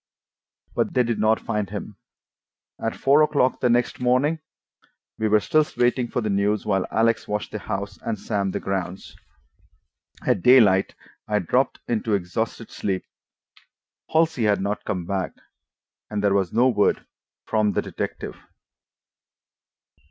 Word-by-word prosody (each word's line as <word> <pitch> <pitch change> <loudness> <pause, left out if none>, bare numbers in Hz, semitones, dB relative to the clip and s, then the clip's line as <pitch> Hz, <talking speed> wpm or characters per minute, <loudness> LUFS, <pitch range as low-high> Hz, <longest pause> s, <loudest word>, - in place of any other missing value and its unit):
But - - -1
they 125 - +4
did 115 -2 -2
not 110 +1 +3
find 105 -3 -2
him. - - -6 0.9
At 115 - -1
four 140 +3 +4
o'clock 145 -4 +2
the 125 - +2
next 120 +1 +1
morning 130 +6 +2 0.8
we 110 - +1
were 105 0 +4
still 155 +8 +3
waiting 125 0 +2
for 120 0 -2
news, 105 0 0
while 95 -3 +1
Alex 115 0 +1
watched 105 0 -3
the 105 - -4
house 100 -2 -5
and 115 -2 -3
Sam 100 0 -1
the - - -3
grounds. 95 -1 -4 1.1
At - - +2
daylight 105 -5 +5 0.3
I 105 - +1
dropped 125 +8 0
into 110 -2 0
exhausted 110 +5 -3
sleep. 95 -2 -3 1.1
Halsey 160 -7 +2
had 105 -1 +3
not 100 +2 -3
come 90 -3 -2
back, 95 0 -2 0.8
and 105 -1 -3
there 100 -1 +3
was 95 -3 +1
no 120 +3 +4
word 110 -5 +2 0.4
from 110 -2 +1
the - - 0
detective. - - -5
110 Hz, 140 wpm, -24 LUFS, 100-125 Hz, 1.1 s, daylight